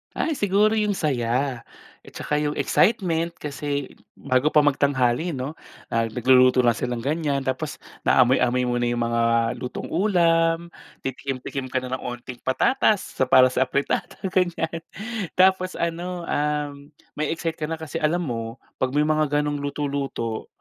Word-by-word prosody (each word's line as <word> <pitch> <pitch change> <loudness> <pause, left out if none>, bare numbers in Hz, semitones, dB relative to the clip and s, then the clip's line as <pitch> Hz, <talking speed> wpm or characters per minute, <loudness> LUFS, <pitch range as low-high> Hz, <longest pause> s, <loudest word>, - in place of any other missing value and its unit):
Ay, 325 - 0
siguro 205 +2 +3
yung 210 -2 +1
saya. 125 -4 -1 0.4
At - - -13
saka 150 0 -1
yung 150 0 -1
excitement 170 -5 +1
kasi 145 -1 -4 0.2
bago 130 +1 +1
pa 150 -1 +4
magtanghali 140 +2 +1
'no, 130 +3 -4 0.4
ah, 115 0 +1
nagluluto 125 +2 +4
na 120 - +5
silang 120 0 -3
ganyan 145 -2 -1
tapos 130 +3 -3 0.3
naamoy-amoy 125 0 +4
muna 120 0 0
yung 120 0 0
mga 115 0 0 0.4
lutong 125 - -6
ulam, 170 -3 +2 0.3
titikim 135 0 -4
tikim 135 -2 -4
ka 130 0 -2
na 130 +1 -3
ng - - -12
unting 120 0 -7
patatas 210 - +2
sa 130 -5 0
para 130 0 +6
sa 130 0 +1
afritada, 140 +2 -1 0.2
ganyan. 170 -3 0 0.6
Tapos 185 0 +3
ano, 175 +1 -3
um, 145 -2 -2 0.3
ma-e-excite 160 +1 -2
ka 155 - -2
na 165 - -2
kasi 160 +1 -5
alam 170 +3 +1
mo 115 -4 -4 0.2
'pag 130 +2 -1
may 150 - +4
mga 150 -1 +1
ganong 145 -1 -2
luto-luto, 140 -5 -3
145 Hz, 150 wpm, -24 LUFS, 130-165 Hz, 0.6 s, para